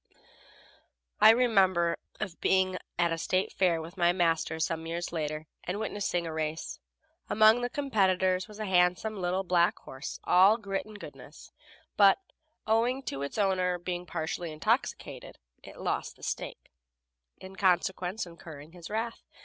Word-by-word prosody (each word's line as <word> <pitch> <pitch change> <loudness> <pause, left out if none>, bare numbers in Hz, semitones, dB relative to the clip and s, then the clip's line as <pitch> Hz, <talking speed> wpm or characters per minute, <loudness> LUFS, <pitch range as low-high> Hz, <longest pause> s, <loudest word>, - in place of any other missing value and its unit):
I - - +9
remember 195 -8 +4 0.2
of 185 -5 -5
being 185 -1 +2 0.2
at 170 -1 +2
a 165 - -2
State 185 +3 0
fair 175 -3 +2
with 165 +4 -9
my 175 -1 +4
master 165 -2 0
some 160 0 -2
years 170 +1 -4
later, 155 -1 -3 0.2
and 185 +4 -3
witnessing 205 -5 -2
a 165 - -4
race. 155 0 -3 0.5
Among 220 +3 +5
the 245 - -1
competitors 190 - +1
was 210 - -12
a 215 - -4
handsome 185 +3 +2
little 180 +2 0
black 175 -1 +2
horse, 130 +2 -8
all 195 +5 +6
grit 200 -2 -4
and 215 -1 -11
goodness, - - -12 0.5
but, 200 -2 +7 0.5
owing 235 +5 +1
to 135 - -4
its 140 +7 -4
owner 185 -3 +1
being 175 0 -5
partly 160 +1 -3
intoxicated, 155 - -2 0.2
it - - -13
lost - - -2
the - - -20
stake, - - -5 0.7
in 190 0 -11
consequence 185 +1 +1
incurring 160 -3 -11
his 175 -1 -11
wrath. 225 +2 -3
185 Hz, 150 wpm, -29 LUFS, 170-205 Hz, 0.7 s, I